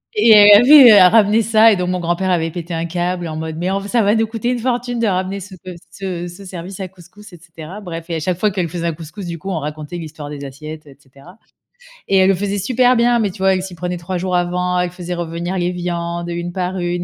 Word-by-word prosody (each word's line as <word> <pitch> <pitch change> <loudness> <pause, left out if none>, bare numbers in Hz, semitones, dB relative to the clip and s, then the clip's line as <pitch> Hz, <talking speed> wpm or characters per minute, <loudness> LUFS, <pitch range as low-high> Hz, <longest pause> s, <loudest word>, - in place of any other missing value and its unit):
et 420 - +4
elle 205 0 +8
avait 255 -6 +8
ramené 215 +3 +4
ça, 225 +1 +5
et - - +3
donc 180 -1 -2
mon 180 0 -1
grand-père 175 +2 -1
avait 165 -2 0
pété 170 +1 -7
un 165 0 -2
câble 175 0 -3
en 155 - -6
mode: 160 0 -5
«Mais 175 +2 -2
enf 195 +1 -2
ça 235 +3 +1
va 205 +1 +2
nous 225 0 +2
coûter 225 +1 -4
une 250 - 0
fortune 245 0 -2
de 230 - +1
ramener 190 0 -1
ce 195 +1 -11
pe 185 -1 -8 0.2
ce 180 -3 -5
ce 175 +3 -11
service 180 +1 -8
à 190 - -4
couscous» 195 +3 -17
et - - -11
cetera. 165 +2 -11
Bref, 165 -3 -8
et 170 - -2
à - - -2
chaque 175 +2 -3
fois 210 - +2
qu'elle 185 -3 -2
faisait 170 0 -4
un 165 - -1
couscous, 165 +5 -9
du 170 -1 -5
coup, 190 +4 -6
on 170 - -2
racontait 150 +2 -6
l'histoire 155 -3 -8
des 145 -1 -8
assiettes, 155 +3 -9
et 135 - -16
cetera, 140 +7 -18 0.7
et 195 - +1
elle 190 0 +4
le 195 - +3
faisait 200 +2 -3
super 250 +5 +2
bien, 240 0 +2
mais 215 -3 0
tu 195 - -15
vois? 190 0 +3
Elle 185 - -1
s'y 190 -2 -8
prenait 180 +1 -4
3 175 +2 -5
jours 180 0 -1
avant, 180 +1 -1
elle 180 0 -1
faisait 180 0 -6
revenir 170 +2 -4
les 175 0 -1
viandes 170 -1 -4
une 175 0 -5
par 185 0 -3
une, 175 0 -2
180 Hz, 265 wpm, -18 LUFS, 170-200 Hz, 0.7 s, elle